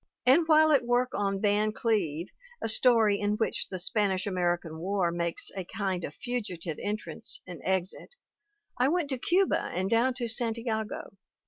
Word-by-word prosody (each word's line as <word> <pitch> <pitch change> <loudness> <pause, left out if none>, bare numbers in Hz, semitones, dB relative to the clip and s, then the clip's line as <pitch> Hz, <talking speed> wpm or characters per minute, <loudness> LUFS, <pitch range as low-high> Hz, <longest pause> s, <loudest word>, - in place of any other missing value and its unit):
And 300 +6 +5
while 315 -1 +6
at 280 -4 +4
work 245 +1 +1
on 195 -1 -1
Van 210 +1 +2
Cleve, 190 -8 -1 0.3
a - - -2
story 220 -2 +4
in 205 0 0
which 225 - 0
the 185 - -4
Spanish 190 0 0
American 175 -4 -1
War 185 0 0
makes 170 0 -2
a 190 - -3
kind 190 -1 -3
of 145 - -6
fugitive 180 -10 -4
entrance 215 - -4
and - - -9
exit, 190 - -2 0.6
I 250 - +4
went 325 -1 0
to 260 - -2
Cuba, 370 +8 +2
and 190 +2 -2
down 245 +3 +3
to 245 -2 -2
Santiago. 225 -3 -3
210 Hz, 160 wpm, -28 LUFS, 185-245 Hz, 0.6 s, while